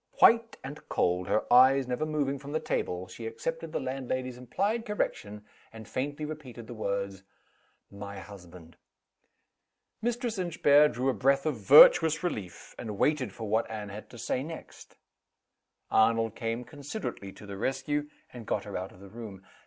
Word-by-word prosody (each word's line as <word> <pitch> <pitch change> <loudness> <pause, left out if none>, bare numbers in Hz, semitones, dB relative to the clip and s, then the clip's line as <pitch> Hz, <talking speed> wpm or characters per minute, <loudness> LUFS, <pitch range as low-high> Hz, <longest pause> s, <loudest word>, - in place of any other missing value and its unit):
White 230 0 +5
and 140 +3 -7
cold, 90 +1 +1
her 110 - +2
eyes 130 +1 +6
never 125 +5 -1
moving 140 -3 -1
from 140 +1 -8
the 155 - +1
table, 95 - -2
she 115 - -7
accepted 165 - -4
the - - -1
landlady's 130 -1 -3
implied 200 - -1
correction, 105 - -3 0.3
and 110 -2 -11
faintly 145 +3 -3
repeated 140 -7 -8
the 120 - -8
words: 100 -3 -3 0.7
"My 100 0 -8
husband." 90 -4 -12 1.2
Mistress 240 -2 -2
Inchbare 150 -4 +5
drew 130 +1 -1
a - - +2
breath 135 +2 +2
of 150 -5 0
virtuous 155 - +7
relief, 100 - -5
and 105 -4 -5
waited 135 -6 +1
for 110 +2 -7
what 110 +2 +1
Anne 105 -2 -5
had 105 +2 -9
to 120 - -12
say 125 - -2
next. 160 +3 -10 1.0
Arnold 115 0 +3
came 115 +1 -3
considerately 145 - -6
to - - -13
the 100 -1 -7
rescue, 145 +6 -1 0.2
and 120 -3 -9
got - - -1
her 105 - -8
out 95 +1 -4
of 90 - -17
the 100 - -11
room. 105 -3 -9
125 Hz, 160 wpm, -29 LUFS, 105-150 Hz, 1.2 s, virtuous